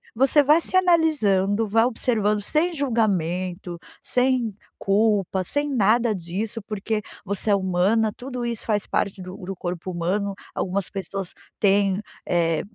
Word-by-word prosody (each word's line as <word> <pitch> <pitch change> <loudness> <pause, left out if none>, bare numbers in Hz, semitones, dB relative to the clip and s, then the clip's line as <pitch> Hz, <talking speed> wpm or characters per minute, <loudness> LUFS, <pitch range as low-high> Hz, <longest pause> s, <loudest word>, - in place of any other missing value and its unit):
você 270 +4 +4
vai 300 +4 +5
se 370 - -5
analisando, 225 - +3
vai 225 +3 +3
observando 215 -4 0
sem 320 - +1
julgamento, 185 - -1 0.3
sem 250 -2 +1 0.3
culpa, 200 -2 +2
sem 290 +10 -1
nada 230 0 +3
disso, 195 +6 -4
porque 215 +1 -2 0.2
você 200 +2 -2
é - - +6
humana, 195 +4 +2
tudo 250 -1 -5
isso 235 -2 -4
faz 210 -2 0
parte 195 -1 -1
do 185 +2 -8
do 195 -1 -6
corpo 175 0 -5
humano. 190 +4 -1 0.2
Algumas 195 0 -1
pessoas 195 -1 -5 0.3
têm, 200 -1 +3 0.3
eh, 165 -2 +1
205 Hz, 135 wpm, -24 LUFS, 190-235 Hz, 0.3 s, é